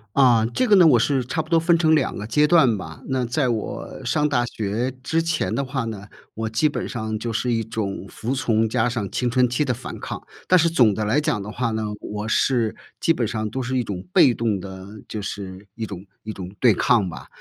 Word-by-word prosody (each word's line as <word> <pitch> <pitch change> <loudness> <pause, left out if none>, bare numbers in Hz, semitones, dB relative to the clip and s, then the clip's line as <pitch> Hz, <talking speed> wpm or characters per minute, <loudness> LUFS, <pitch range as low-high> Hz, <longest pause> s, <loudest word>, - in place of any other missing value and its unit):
啊， 120 -5 +5
这 255 - +2
个 205 -4 +5
呢 175 -3 +7
我 130 - +6
是 130 +2 +1
差 160 +6 -1
不 155 - -13
多 165 -1 +4
分 170 +1 +3
成 160 -1 +3
2 150 -4 +1
个 105 - -5
阶 150 +8 +3
段 135 -10 +5
吧。 80 -3 -9
那 130 -1 0
在 130 +2 0
我 110 -3 -4
上 150 -1 +1
大 120 -4 +1
学 110 +2 -2
之 165 +5 +1
前 165 -1 -1
的 140 - -1
话 130 0 -2
呢， 105 -3 -6 0.3
我 110 0 -3
基 130 +8 +2
本 - - -4
上 110 -2 -4
就 115 +1 -3
是 120 +3 0
一 115 -1 +1
种 100 -3 -4
服 115 +6 -4
从， 115 -4 +1
加 115 - +1
上 115 -6 -3
青 125 - 0
春 125 0 +3
期 135 +5 0
的 130 - 0
反 125 +2 -8
抗。 - - -6 0.2
但 185 - +6
是 170 -1 +3
总 120 -10 +4
的 110 - -2
来 110 +8 +2
讲 145 -10 -1
的 105 - -7
话 115 0 -1
呢， 110 0 -2 0.2
我 105 0 -5
是 115 -3 +1 0.2
基 - - +3
本 125 -9 0
上 110 -1 -3
都 130 +4 -3
是 130 +1 -2
一 125 - +1
种 95 -4 -6
被 125 - +6
动 115 -3 0
地， 95 +2 -10
就 105 - -4
是 100 -1 -7
一 115 - -4
种 100 -2 -8 0.2
一 110 - -5
种 95 -3 -7
对 120 -4 +6
抗 100 -2 +2
吧。 70 -6 -9
115 Hz, 255 characters per minute, -23 LUFS, 105-135 Hz, 0.3 s, 呢